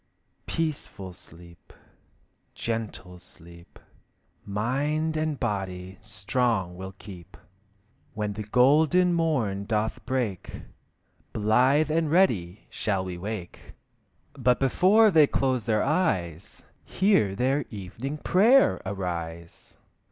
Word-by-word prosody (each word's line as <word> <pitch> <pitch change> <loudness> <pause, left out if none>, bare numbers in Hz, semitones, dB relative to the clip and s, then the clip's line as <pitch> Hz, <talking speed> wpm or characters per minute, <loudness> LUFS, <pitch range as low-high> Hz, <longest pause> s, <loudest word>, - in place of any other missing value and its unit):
Peaceful 140 - -4
sleep, 85 0 -15 0.8
gentle 110 -6 -5
sleep, 85 0 -15 0.7
Mind 145 +10 -1
and 155 -2 -1
body 95 -5 -4
strong 100 -1 -1
will 95 +1 -8
keep. 90 -4 -12 0.8
When 105 -1 -2
the 105 - -6
golden 150 - +3
morn 130 -13 0
doth 110 0 -2
break, 120 -8 -3 0.7
Blithe 130 +8 +3
and 160 0 +1
ready 110 - +1
shall 95 -3 -1
we 90 -1 -6
wake. 100 -2 -7 0.6
But 125 -1 +1
before 195 - +4
they 155 -4 +6
close 130 -6 0
their 110 -2 +1
eyes, 100 - -1 0.2
Hear 185 - +2
their 135 +6 +1
evening 110 +8 -6
prayer 225 - +4
arise! 85 -4 -6
110 Hz, 100 wpm, -26 LUFS, 95-150 Hz, 0.8 s, they